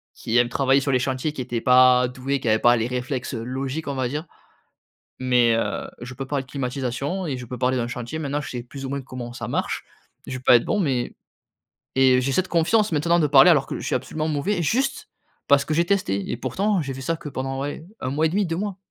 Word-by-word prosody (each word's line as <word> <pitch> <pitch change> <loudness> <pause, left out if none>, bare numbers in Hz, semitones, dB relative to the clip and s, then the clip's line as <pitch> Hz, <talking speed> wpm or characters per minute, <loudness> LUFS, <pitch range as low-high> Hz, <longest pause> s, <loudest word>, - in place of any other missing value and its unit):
qui 115 +2 -1
aime 120 0 +4
travailler 135 +1 +3
sur 140 - -1
les 130 - +3
chantiers, 130 +4 -1
qui 135 - -5
était 120 -2 -3
pas 125 -1 +6
doué, 130 +2 -2
qui 115 - -1
avait 110 0 +3
pas 120 0 +5
les 115 +1 0
réflexes, 125 +1 -3
heu, 115 - -4
logiques, 135 +5 -4
on 140 - -2
va 130 -1 0
dire. 150 +4 -4 0.9
Mais 125 -2 +3
heu, 115 - -2
je 125 +1 -7
peux 135 - -5
parler 140 -2 -1
de 130 - -22
climatisation 135 +6 -3
et 135 -3 -2
je 125 - -7
peux 125 +1 -7
parler 130 0 +1
d'un 120 -1 -1
chantier. 120 +5 -5
Maintenant, 145 -1 -2
je - - -7
sais 120 -1 -5
plus 135 +3 -8
ou 130 - -4
moins 140 0 -3
comment 125 -2 -7
ça 120 -2 -6
marche. 120 - -2 0.4
Je 130 - -5
vais 130 - -12
pas 125 - +7
être - - -3
bon 210 - 0
mais 135 -9 -1 0.8
et 130 -1 +5
j'ai 135 +2 -1
cette 185 +5 +1
confiance 190 +6 +2
maintenant 170 +3 +2
de 150 - +3
parler 140 +4 +7
alors 150 -5 +3
que - - -4
je - - -6
suis - - 0
absolument 155 +5 -3
mauvais, 170 +6 0
juste 265 - 0 0.4
parce 140 0 +4
que 155 - -1
j'ai 170 +2 +2
testé 170 - 0
et 120 - -2
pourtant 200 +9 0
j'ai 135 -2 -4
fait 130 - -8
ça 165 +5 -1
que, 150 - -8
ouais, - - -18
pendant 135 +1 -3 0.4
1 130 - -2
mois 155 +3 +1
et - - -2
1/2, 200 +4 +1
2 165 -1 -2
mois. 200 0 -3
135 Hz, 255 wpm, -23 LUFS, 125-155 Hz, 0.9 s, pas